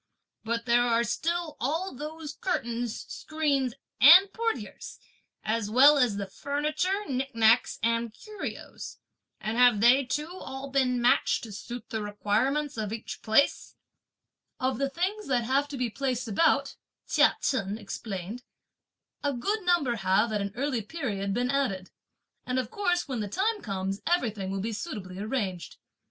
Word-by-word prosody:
But 230 +1 -2
there 240 0 +4
are 235 -1 +2
still 330 +7 -2
all 325 +9 -1
those 300 +2 -7
curtains, 240 - -3
screens 280 -6 -1 0.2
and 365 +8 +9
portieres, 455 -1 -4 0.5
as 215 -1 -1
well 280 +6 +7
as 240 -6 +2
the 200 - -2
furniture, 305 - -1
nicknacks 250 -4 +2
and 230 0 +1
curios; 420 - -8 0.4
and 220 +2 -3
have 245 -4 +6
they 245 +5 +6
too 295 +4 -2
all 270 +1 -7
been 255 -2 +2
matched 240 +1 +3
to 225 - -8
suit 235 +6 -8
the 220 -2 -2
requirements 230 +8 0
of 215 -2 -3
each 225 0 -6
place?" 220 +6 +2 0.8
"Of 260 0 -1
the 275 0 +1
things 380 +8 -2
that 250 -3 +1
have 270 +4 +1
to 285 -1 -6
be 250 -3 -1
placed 255 -1 -2
about," 225 +10 +2 0.3
Chia - - +4
Chen 205 -5 -1
explained, 205 0 -6 0.8
a 285 -1 +1
good 405 - -1
number 340 -10 +2
have, 200 +4 +2
at 210 - 0
an 200 0 -3
early 260 -2 -1
period, 210 -7 -3
been 245 +5 0
added, 200 -10 -1 0.5
and 250 0 -2
of 250 -3 -2
course 355 -4 0
when 260 -4 -3
the 210 - -2
time 410 - 0
comes 195 -1 -3
everything 220 - 0
will 195 0 -2
be 225 +3 -3
suitably 200 - -6
arranged. 205 -5 -3
250 Hz, 150 wpm, -28 LUFS, 220-295 Hz, 0.8 s, and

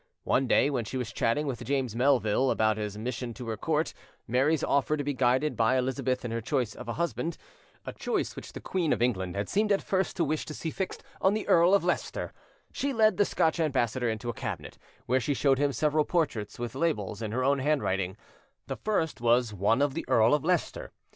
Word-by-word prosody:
One 135 0 +1
day 140 - +3
when 125 -4 -1
she 120 +5 -5
was 120 -3 -4
chatting 145 +7 +1
with 125 -4 -4
James 130 -3 -1
Melville 130 -1 +3
about 110 -2 +2
his 105 -1 -4
mission 120 +1 -4
to 125 -2 -8
her 110 - -1
court, 155 +8 -1 0.3
Mary's 135 +6 +2
offer 140 +2 +1
to 145 - -2
be 145 0 -1
guided 130 +3 +2
by 115 +3 +3
Elizabeth 130 0 -1
in 120 - -3
her 115 0 -2
choice 120 -1 -1
of - - -10
a 115 - -2
husband,—a 170 0 -5
choice - - -2
which - - -9
the - - -6
queen 175 -5 0
of - - -3
England 95 -7 -1
had 100 +1 -2
seemed 210 +1 +1
at 200 - +2
first 190 -1 -1
to 170 - +2
wish 155 0 -1
to 155 - -6
see 160 - -4
fixed 190 +3 -4 0.2
on 190 +2 +3
the 215 - -3
Earl 175 +3 +5
of 200 - +2
Leicester,—she 280 0 -4
led 220 -2 +4
the 205 - +4
Scotch 160 -2 +1
ambassador 130 -6 +1
into 110 +1 -4
a 120 - -1
cabinet, - - -6 0.3
where 130 +2 +2
she 140 +3 -1
showed 135 -1 +2
him 145 0 +2
several 150 +4 +2
portraits 145 - -1
with 120 -1 -4
labels 130 - -1
in 110 -2 -3
her 130 +3 -1
own 140 +1 +2
handwriting: 100 -10 0 0.5
the - - -5
first 165 - -1
was 120 -1 +3
one 105 +7 +2
of 145 -2 0
the 165 - -4
Earl 115 +2 +4
of 150 - +2
Leicester. 185 - -1
130 Hz, 215 wpm, -28 LUFS, 115-155 Hz, 0.5 s, Earl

